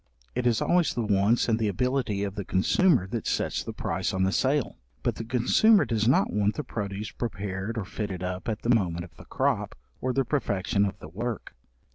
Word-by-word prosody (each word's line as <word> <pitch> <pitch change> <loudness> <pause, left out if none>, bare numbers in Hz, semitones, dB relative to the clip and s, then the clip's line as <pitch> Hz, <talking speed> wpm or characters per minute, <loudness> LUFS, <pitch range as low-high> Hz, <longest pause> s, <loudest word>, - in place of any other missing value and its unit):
It 125 0 0
is 115 -3 +2
always 175 -1 +2
the 120 - 0
wants 105 +3 +3
and 115 -1 +2
the 110 - +1
ability 120 -2 0
of 100 -1 -3
the 100 0 -4
consumer 120 - +3
that 115 0 -3
sets - - 0
the - - -5
price - - -2
on 95 - +1
the 95 - +2
sale; 135 +4 0 0.2
but - - +1
the - - -4
consumer 130 - +4
does 115 -2 0
not 130 - +3
want 105 0 +1
the 150 - -3
produce 105 -4 -4
prepared 100 -1 -4
or 105 - -2
fitted 95 -2 -4
up 90 +3 -3
at 110 - -3
the 120 - +4
moment 85 -6 0
of 85 -3 -18
the - - -13
crop, - - -1 0.3
or 130 - 0
the 135 +1 +1
perfection 100 -6 0
of 100 - -3
the - - -10
work. 110 +7 -5
110 Hz, 210 wpm, -27 LUFS, 100-125 Hz, 0.3 s, consumer